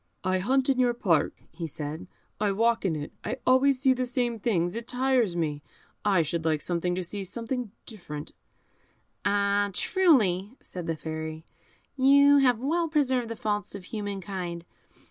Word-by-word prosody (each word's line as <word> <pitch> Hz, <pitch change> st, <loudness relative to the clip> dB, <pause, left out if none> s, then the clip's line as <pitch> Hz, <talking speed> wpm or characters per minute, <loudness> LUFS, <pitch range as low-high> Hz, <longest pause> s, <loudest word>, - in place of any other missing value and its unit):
"I 185 Hz, 0 st, +1 dB
hunt 260 Hz, +7 st, +2 dB
in 265 Hz, -2 st, +2 dB
your 245 Hz, -1 st, +3 dB
park," 170 Hz, -10 st, +1 dB
he 165 Hz, 0 st, -5 dB
said; 150 Hz, +2 st, -6 dB, 0.3 s
"I 205 Hz, -2 st, +1 dB
walk 230 Hz, +1 st, +2 dB
in 170 Hz, -4 st, +1 dB
it; 150 Hz, -1 st, -6 dB
I 255 Hz, -, -3 dB
always 260 Hz, +1 st, +4 dB
see 265 Hz, 0 st, +4 dB
the 255 Hz, 0 st, -2 dB
same 245 Hz, -2 st, -1 dB
things, 175 Hz, -6 st, 0 dB
it 230 Hz, +1 st, -6 dB
tires 250 Hz, -7 st, +1 dB
me; 150 Hz, -4 st, -1 dB, 0.4 s
I 195 Hz, -5 st, +3 dB
should 165 Hz, +2 st, -2 dB
like 160 Hz, -1 st, +1 dB
sometimes 175 Hz, +1 st, -1 dB
to 185 Hz, -, -1 dB
see 195 Hz, +3 st, -5 dB
something 235 Hz, +3 st, -4 dB
different." 150 Hz, -9 st, -8 dB, 0.9 s
"Ah! 200 Hz, 0 st, +2 dB
truly," 220 Hz, -, +2 dB
said 180 Hz, -2 st, -8 dB
the 165 Hz, -, -1 dB
Fairy, 160 Hz, 0 st, -5 dB, 0.5 s
"you 280 Hz, +1 st, +6 dB
have 250 Hz, -4 st, +4 dB
well 325 Hz, +8 st, 0 dB
preserved 260 Hz, -6 st, +1 dB
the 230 Hz, -, -4 dB
faults 205 Hz, -2 st, -2 dB
of 200 Hz, -, -8 dB
human 205 Hz, 0 st, -5 dB
kind. 175 Hz, -2 st, -5 dB
205 Hz, 165 wpm, -27 LUFS, 175-250 Hz, 0.9 s, you